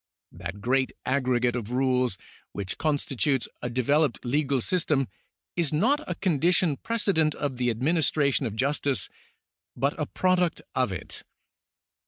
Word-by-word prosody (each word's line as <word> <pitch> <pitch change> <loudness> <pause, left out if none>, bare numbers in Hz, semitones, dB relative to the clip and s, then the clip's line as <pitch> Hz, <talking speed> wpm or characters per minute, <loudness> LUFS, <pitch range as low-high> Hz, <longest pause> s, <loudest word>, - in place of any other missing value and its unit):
That 85 +3 -7
great 130 +3 +1
aggregate 125 -2 +1
of 115 -3 -4
rules 125 -3 +1 0.4
which 100 -2 -5
constitutes 145 -3 0
a 125 - -2
developed 130 0 +1
legal 140 +1 +1
system 150 -2 +1 0.5
is 170 -5 +1
not 260 - +2
a - - -1
condition 170 -3 +2
precedent 195 -9 +1
of 140 -4 -3
the 125 -1 +1
administration 140 +1 +1
of 110 - -6
justice, 140 +2 +1 0.7
but 140 +1 +1
a 150 - -1
product 180 -2 +1
of 130 -5 +1
it. 90 - -6
135 Hz, 130 wpm, -27 LUFS, 125-155 Hz, 0.7 s, not